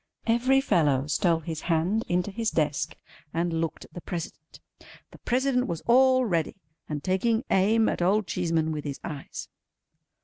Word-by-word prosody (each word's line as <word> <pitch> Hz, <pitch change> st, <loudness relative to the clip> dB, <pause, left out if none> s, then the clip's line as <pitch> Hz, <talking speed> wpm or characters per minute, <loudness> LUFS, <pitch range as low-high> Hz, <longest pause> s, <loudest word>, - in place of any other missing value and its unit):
Every 250 Hz, +4 st, +3 dB
fellow 145 Hz, -, +2 dB
stole 165 Hz, +3 st, +1 dB
his 160 Hz, 0 st, -5 dB
hand 175 Hz, +6 st, +1 dB
into 180 Hz, +3 st, 0 dB
his 225 Hz, +2 st, -1 dB
desk 150 Hz, -5 st, -1 dB, 0.4 s
and 165 Hz, -1 st, 0 dB
looked 165 Hz, -, -4 dB
at -, -, -22 dB
the 175 Hz, -, -7 dB
President. 165 Hz, -3 st, -7 dB, 0.5 s
The -, -, -15 dB
President 250 Hz, 0 st, +1 dB
was 165 Hz, -2 st, -4 dB
all 255 Hz, +1 st, +5 dB
ready, 170 Hz, -7 st, -1 dB, 0.3 s
and 150 Hz, -2 st, -4 dB
taking 220 Hz, +6 st, +1 dB
aim 220 Hz, +4 st, +3 dB
at -, -, -1 dB
old 200 Hz, +4 st, +2 dB
Cheeseman 165 Hz, -3 st, 0 dB
with 150 Hz, -1 st, -4 dB
his 140 Hz, -2 st, -5 dB
eyes. 145 Hz, -4 st, -7 dB
175 Hz, 160 wpm, -27 LUFS, 160-225 Hz, 0.5 s, all